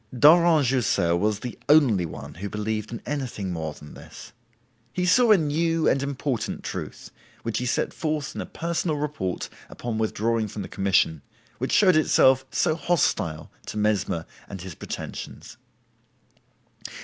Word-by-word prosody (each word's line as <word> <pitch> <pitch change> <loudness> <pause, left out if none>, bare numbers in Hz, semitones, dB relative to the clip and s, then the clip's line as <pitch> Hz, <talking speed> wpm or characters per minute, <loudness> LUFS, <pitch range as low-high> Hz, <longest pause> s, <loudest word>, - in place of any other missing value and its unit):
Daurent 160 +1 +6
Jussieu 120 -9 +2
was 105 +3 0
the 125 - -6
only 125 - +5
one 75 -1 -9
who 100 +6 -6
believed 105 +1 -3
in 115 - -6
anything 125 -10 -3
more 80 -2 -4
than 75 - -12
this. - - -12 0.6
He 180 - -1
saw 230 +7 +5
a 210 - +8
new 165 +1 +1
and 135 - +3
important 140 -2 -3
truth, - - -6 0.3
which 115 - -2
he 125 - -2
set - - 0
forth 150 -3 -2
in - - -4
a - - -6
personal 170 -2 -2
report 145 -12 -3 0.2
upon 115 -2 -4
withdrawing 110 +1 0
from 105 0 -6
the - - -7
commission, 95 -6 +1 0.4
which - - -2
showed 185 -5 +5
itself 130 -4 +4
so 155 - +1
hostile 145 - 0 0.2
to - - -5
Mesmer 105 -6 0 0.2
and 95 -3 -7
his 95 -1 -7
pretensions. - - -7
120 Hz, 150 wpm, -25 LUFS, 100-150 Hz, 0.6 s, a